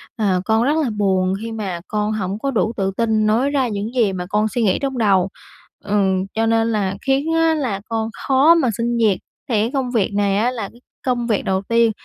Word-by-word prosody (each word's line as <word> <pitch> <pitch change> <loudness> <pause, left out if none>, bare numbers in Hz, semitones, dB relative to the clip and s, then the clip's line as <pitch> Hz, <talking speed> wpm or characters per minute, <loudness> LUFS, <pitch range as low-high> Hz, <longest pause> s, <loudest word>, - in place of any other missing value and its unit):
"Ờ, 195 -5 +1
con 220 +2 +2
rất 290 +5 +2
là 260 - 0
buồn, 190 -2 +1
khi 230 0 -5
mà 200 -6 -4
con 210 0 -1
hổng 200 -1 -3
có 275 +4 -1
đủ 225 -2 0
tự 195 -1 0
tin 220 -2 +1
nói 230 +6 +2
ra 270 -3 +1
những 210 +1 -4
gì 225 -6 +2
mà 180 -1 -4
con 210 +1 +1
suy 230 +3 -1
nghĩ 195 -4 +2
trong 270 -2 -2
đầu. 195 -5 +3 0.5
Ừm, 190 -2 +1
cho 225 +1 +1
nên 225 0 +2
là 200 -3 0
khiến 275 +4 0
á 325 0 +3
là 245 -10 -2
con 225 -1 -1 0.2
khó 280 +5 +5
mà 290 -7 +2
xin 235 0 -1
việc." 210 -5 +2 0.3
Thì 220 -4 +2
cái 225 +3 -1
công 265 -3 -1
việc 215 -4 0
này 200 -1 +1
á 235 +4 +1
là 220 -6 -5
cái 240 - -20 0.2
công 245 -2 0
việc 215 -4 +1
đầu 190 0 0
tiên, 230 +2 +2
220 Hz, 235 wpm, -20 LUFS, 200-245 Hz, 0.5 s, khó